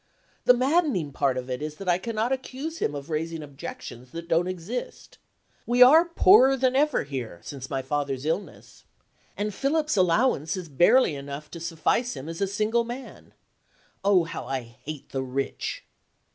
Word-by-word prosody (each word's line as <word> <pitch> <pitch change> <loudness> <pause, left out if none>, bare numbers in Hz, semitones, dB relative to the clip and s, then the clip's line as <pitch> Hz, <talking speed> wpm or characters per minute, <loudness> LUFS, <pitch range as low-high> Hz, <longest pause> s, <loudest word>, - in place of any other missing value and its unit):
The 250 - +7
maddening 260 - +1
part 135 -1 0
of 125 0 -4
it 125 +1 -4
is 150 0 -4
that 195 +3 -9
I 175 0 +3
cannot 225 +3 -2
accuse 265 +5 -4
him 145 - -1
of 140 +3 -7
raising 160 +1 -3
objections 140 - -9
that 170 0 -7
don't 170 +1 +2
exist. 185 +7 -6 0.5
We 245 +1 +7
are 315 +7 +7
poorer 335 -5 +6
than 260 0 +1
ever 295 0 +2
here, 125 -10 -6
since 135 -2 -8
my 135 -1 -2
father's 140 -1 -2
illness 165 +6 -4 0.5
and 210 0 -2
Philip's 300 +4 0
allowance 185 - +2
is 180 -3 -7
barely 175 - +4
enough 140 +1 -7
to 170 - -7
suffice 170 +9 0
him 135 - -7
as 165 +3 -6
a 195 - +2
single 215 +4 +1
man. 245 +3 -9 0.7
Oh, 195 -3 +4
how 165 - -6
I 135 -1 -2
hate 125 +5 -10
the 135 - -2
rich! 130 +1 -3
170 Hz, 170 wpm, -26 LUFS, -, 0.7 s, The